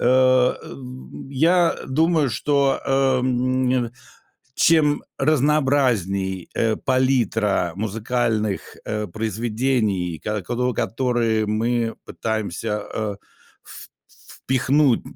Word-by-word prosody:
Э 130 0 +4
э, - - -9 0.6
я, 165 +5 +3
э, - - -9
думаю, 155 +1 +2
что, 140 +4 +1
эм, 130 -2 +1 0.6
чем 150 -2 +3 0.2
разнообразнее, 130 - +1
э, 110 -1 +1
палитра 115 -9 +1
музыкальных, 110 0 -2
э, 105 -1 -2
произведений, 110 -4 -1
ко 105 0 -1
кот 125 +6 -1
которые 115 -3 0
мы 115 +2 0
пытаемся, 105 -1 -3
э, 105 -2 -2 0.5
в - - -12 0.6
впихнуть 130 0 +2
120 Hz, 85 wpm, -22 LUFS, 110-135 Hz, 0.6 s, Э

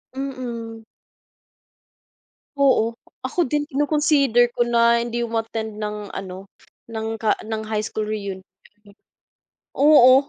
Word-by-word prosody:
Mm. 235 -4 -5 1.7
Oo. 235 -5 +3 0.2
Ako 325 +7 0
din 295 +2 -1
kino-consider 280 -4 +3
ko 240 - +2
na 235 0 +4
hindi 240 0 -3
umattend 225 -2 -3
ng 210 -1 -5
ano 190 0 -7 0.4
ng 220 -1 -4
ka 215 - +2 0.3
high 215 -1 -1
school 215 -1 -3
reunion. 200 -3 -4 1.3
Oo, 275 -2 +7
235 Hz, 100 wpm, -22 LUFS, 220-265 Hz, 1.7 s, Oo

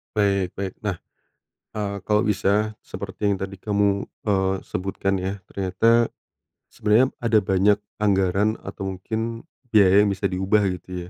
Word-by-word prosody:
Baik 100 -3 +1
baik 95 -1 -4
nah, 100 -5 -3 0.8
eee, 100 -1 -3
kalau 105 +1 +3
bisa 105 +1 +1
seperti 105 - -5
yang - - -3
tadi 95 0 -4
kamu, 100 -1 +1 0.2
eee, 95 -2 +1
sebutkan 95 +1 -2
ya 95 +2 -3
ternyata, 115 +5 +2 0.6
sebenernya 115 +5 +3
ada 115 -2 +3
banyak 100 +1 +3 0.2
anggaran 100 0 +2
atau 95 -1 -5
mungkin 115 +4 -4 0.3
biaya 100 -1 +6
yang - - +1
bisa 100 0 -1
diubah 95 +3 +2 0.2
gitu 90 0 -8
100 Hz, 135 wpm, -23 LUFS, 95-105 Hz, 0.8 s, biaya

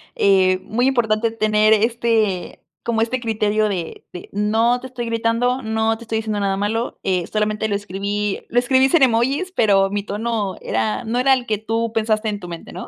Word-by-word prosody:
Eh, 185 -2 +3
muy 245 +4 0
importante 230 -3 +1
tener 215 -1 +3
este 220 -4 0 0.2
como 230 -1 0
este 235 +3 0
criterio 215 -2 0
de 180 -5 -5
de 180 - -9
no 220 +4 +1
te 260 - -8
estoy 245 -2 -5
gritando, 230 +3 0
no 220 0 0
te 235 - -12
estoy 225 -1 -1
diciendo 215 -2 -3
nada 195 -1 0
malo, 215 +4 -2
eh, 180 -3 0
solamente 215 0 -1
lo 205 - -1
escribí 205 +1 -3
lo 245 - +2
escribí 260 +2 +3
sin 305 0 +4
emojis, 265 +9 +1
pero, 195 -3 +4
mi 205 0 -2
tono 210 -1 -2
era 110 -1 -1
no 235 +3 -1
era 265 +1 +4
el 255 -2 0
que 215 -3 -1
tú 225 +2 -2
pensaste 220 -1 0
en 205 -1 -4
tu 180 - -9
mente, 170 -1 -8
¿no? - - -8
220 Hz, 195 wpm, -20 LUFS, 205-235 Hz, 0.2 s, sin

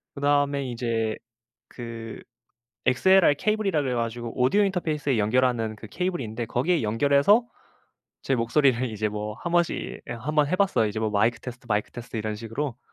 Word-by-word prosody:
그다음에 140 -1 +1
이제 115 -2 -1 0.5
그 115 -2 -8 0.7
XLR 180 +4 +5
케이블이라고 205 -8 0
그래 130 -2 -1
가지고 115 0 -3
오디오 200 +12 +4
인터페이스에 155 - 0
연결하는 115 0 +1
그 110 - -11
케이블이 180 - -2
있는데 115 +2 -4
거기에 150 +8 0
연결해서 140 - +3 0.8
제 135 - +1
목소리를 125 +1 +2
이제 110 0 -1
뭐 105 +1 -5
한 170 - -5
번씩 175 -1 +2 0.3
예, - - -3
1 145 +7 -5
번 150 -1 +4
해 185 - +1
봤어요. 185 - +2
이제 110 +1 -4
뭐 110 -1 0
"마이크 110 +4 +2
테스트, 125 -1 -9
마이크 105 0 0
테스트." 120 -1 -7
이런 110 0 -3
식으로. 115 +4 -4
125 Hz, 400 characters per minute, -25 LUFS, 115-150 Hz, 0.8 s, XLR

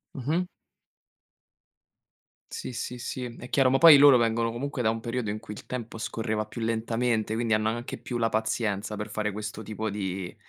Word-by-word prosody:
Mh-mh. 155 +7 -1 2.1
Sì, - - -5
sì, 125 0 -5
sì, 125 +1 -4 0.2
è 125 - -9
chiaro, 130 -2 +3
ma 135 - +3
poi 165 -4 +10
loro 140 -1 +8
vengono 115 0 +1
comunque 130 +2 -3
da 110 - +3
un 115 - -3
periodo 115 -2 -3
in 105 - -4
cui 105 - -9
il - - -11
tempo 120 -3 -6
scorreva 110 -1 -2
più 115 +2 -8
lentamente, 115 0 0
quindi 115 0 0
hanno 110 0 +1
anche 120 +3 -4
più 120 - -5
la 115 -1 +2
pazienza 110 -1 -1
per 105 +1 -5
fare 105 0 -2
questo 105 +2 -6
tipo 110 +1 -4
di 95 -3 -4
115 Hz, 185 wpm, -27 LUFS, 110-125 Hz, 2.1 s, poi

